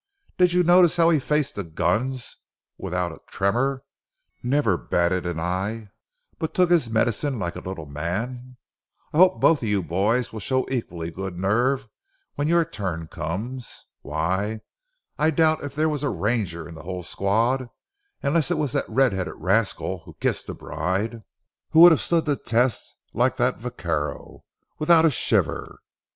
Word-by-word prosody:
Did 180 -1 +4
you 180 0 +3
notice 175 0 +5
how 170 0 +5
he 155 - +3
faced 150 +1 0
the 100 - -4
guns 105 +10 -2 0.4
without 90 -1 -2
a 80 - -13
tremor; 130 +7 0 0.6
never 125 -6 +2
batted 90 +1 0
an 85 -2 -3
eye 95 +5 -3 0.5
but 160 -2 -3
took 180 -1 +3
his 160 -10 +3
medicine 120 +5 0
like 85 -4 -3
a - - -5
little 95 -4 -6
man. 115 - -5 0.6
I - - -1
hope 185 +2 +5
both 165 -3 +4
of 110 - -2
you 100 -2 +1
boys 105 +9 0
will 110 - -5
show 130 +6 0
equally 85 -10 -3
good 95 0 -6
nerve 120 +7 +1 0.5
when 145 +1 -1
your 170 0 +3
turn 90 - -5
comes. 120 +10 -5 0.2
Why, 95 +9 -2 0.6
I 155 +1 +4
doubt 160 0 +2
if 145 -1 -6
there 155 +1 +2
was 150 -3 -2
a 145 - 0
ranger 100 -7 -2
in 85 - -10
the 80 - -10
whole 90 +1 -5
squad, 115 +8 0 0.5
unless 150 +3 +1
it 175 - 0
was 150 -5 -1
that - - -1
red 130 -4 +3
headed 95 -1 -3
rascal 95 0 0
who - - -13
kissed - - -1
the - - -5
bride, 100 +8 -3 0.5
who 160 - +6
would 175 0 +11
have 160 - +3
stood 170 -1 +1
the 145 -2 +1
test 120 -1 0 0.2
like - - +1
that - - +1
vaquero—without 160 +1 -1
a 160 - +5
shiver. - - 0
115 Hz, 165 wpm, -24 LUFS, 95-145 Hz, 0.6 s, would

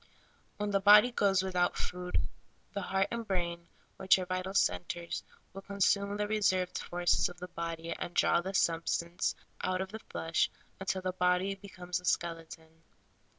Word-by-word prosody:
When 210 0 -2
the 200 - +3
body 210 +4 +8
goes 195 -5 +2
without 180 -2 +1
food, 180 0 -2 0.5
the 200 - -2
heart 195 +1 0
and 235 0 -2
brain, 170 -2 -2 0.3
which 190 - +5
are 185 - -3
vital 185 +1 -3
centers, 170 - 0 0.3
will 195 - -7
consume 200 +1 +1
the 210 0 -1
reserved 190 -4 +1
forces 175 0 +1
of 175 - -12
the 180 0 -8
body 170 -1 -5
and 175 - -5
draw 170 - +4
the 190 +2 -5
substance 170 0 0 0.3
out 185 0 0
of 190 0 -3
the 220 - -6
flesh 165 -6 -1 0.3
until 190 0 -2
the 185 0 -1
body 180 +2 +2
becomes 185 -3 -5
a 180 - -13
skeleton. 165 -1 -3
185 Hz, 160 wpm, -32 LUFS, 175-195 Hz, 0.5 s, body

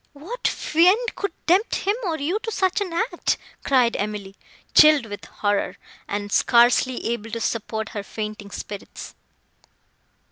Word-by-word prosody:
"What 345 +13 -4
fiend 375 +9 +2
could 400 - -2
tempt 375 +7 +3
him, 405 +2 0
or 330 -3 -1
you, 335 +9 -1
to 450 0 -5
such 380 -1 0
an 380 -4 -2
act!" 350 +1 0 0.3
cried 250 -4 +3
Emily, 205 -1 -4 0.4
chilled 305 -4 +7
with 205 -2 -8
horror, 205 -1 -1 0.3
and 205 0 -4
scarcely 240 +3 +3
able 225 -1 -4
to 230 +1 -4
support 220 -1 -2
her 205 - -5
fainting 210 0 -6
spirits. 200 0 -8
250 Hz, 140 wpm, -23 LUFS, -, 0.4 s, chilled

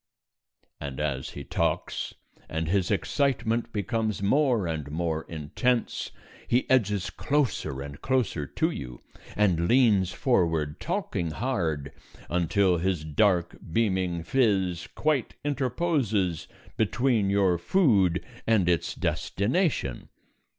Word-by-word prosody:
_" - - -44
And 70 -1 -6
as 70 -3 -2
he 70 - -5
talks, - - -2 0.3
and 80 0 -2
his 95 +2 +1
excitement 115 +1 0
becomes 110 0 -1
more 125 -2 +3
and 80 -4 -3
more 80 0 -2
intense, 100 - -1 0.4
he 125 +2 +2
edges 105 -7 +2
closer 125 - -1
and 70 0 -9
closer 115 - 0
to - - 0
you, 60 -3 -7 0.4
and 90 -5 +2
leans 105 -7 +4
forward, 85 - +1
talking 85 -1 -2
hard, 80 - -2 0.4
until 90 +1 +2
his 90 -3 -1
dark 85 +2 +2 0.2
beaming 95 -5 0
phiz 95 -7 +1
quite 150 -5 0
interposes 130 - 0 0.3
between 115 -1 +2
your 95 -3 +3
food 100 - +3 0.2
and 110 -6 +3
its 85 -1 +1
destination. 110 - -1
95 Hz, 110 wpm, -27 LUFS, 80-120 Hz, 0.4 s, leans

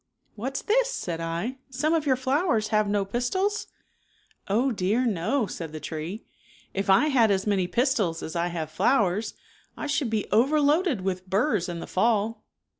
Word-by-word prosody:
" - - -50
What's 255 +6 -4
this," - - +2
said 175 - -4
1, 170 +11 -3
" - - -44
some 285 +5 0
of 315 -3 0
your 260 - +4
flowers 260 - +1
have 215 -2 +2
no 205 -1 +1
pistils? 375 - -1 0.3
" - - -39
" - - -37 0.2
Oh, 240 +7 +2
dear, 215 +4 +1
no," 225 +5 0
said 165 -5 -7
the 155 - -5
tree, 160 - -6 0.2
" - - -26
if 195 0 -2
I 195 +11 +5
had 240 -6 +4
as 195 -1 +1
many 195 -4 +1
pistils 215 - 0
as 160 - -6
I 170 +1 +1
have 165 -3 -4
flowers 210 +2 +1 0.4
I - - -4
should 290 -3 0
be 215 -2 -1
overloaded 290 - +3
with 185 0 -3
burs 200 - +1
in 170 -1 -5
the - - -5
fall." 220 +1 0
215 Hz, 190 wpm, -26 LUFS, 185-265 Hz, 0.4 s, I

